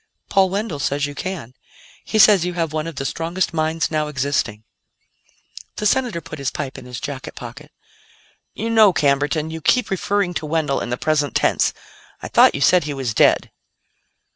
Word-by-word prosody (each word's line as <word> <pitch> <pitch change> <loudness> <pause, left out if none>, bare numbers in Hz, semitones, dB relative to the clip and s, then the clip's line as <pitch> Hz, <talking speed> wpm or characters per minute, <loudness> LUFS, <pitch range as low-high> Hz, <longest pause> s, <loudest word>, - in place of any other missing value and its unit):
"Paul 195 -1 +4
Wendell 195 -5 -3
says 140 +1 0
you 145 - -6
can. 160 -6 -6 0.5
He 220 - -2
says 210 -4 +7
you 180 0 -2
have 165 -3 -2
one 155 +1 -2
of 165 - -7
the 135 - -4
strongest 170 +5 -2
minds 160 0 -1
now 155 -1 0
existing." 135 -7 -2 1.1
The 210 - -4
Senator 235 -5 +1
put 155 0 -9
his 140 -1 -1
pipe 140 -3 -5
in - - -13
his 125 -1 -7
jacket 135 -2 -6
pocket. 140 +6 -10 0.8
"You 230 - -3
know, 215 -4 +6
Camberton, 145 +2 +1
you 160 0 -6
keep 250 +8 +2
referring 195 -1 0
to 160 -2 -4
Wendell 155 -3 0
in - - -4
the 125 - -2
present 145 -3 0
tense. - - +2 0.5
I - - -7
thought - - +5
you 140 - -4
said 180 +1 +4
he 145 -2 -4
was 130 -4 -3
dead." - - +3
155 Hz, 185 wpm, -20 LUFS, 140-180 Hz, 1.1 s, says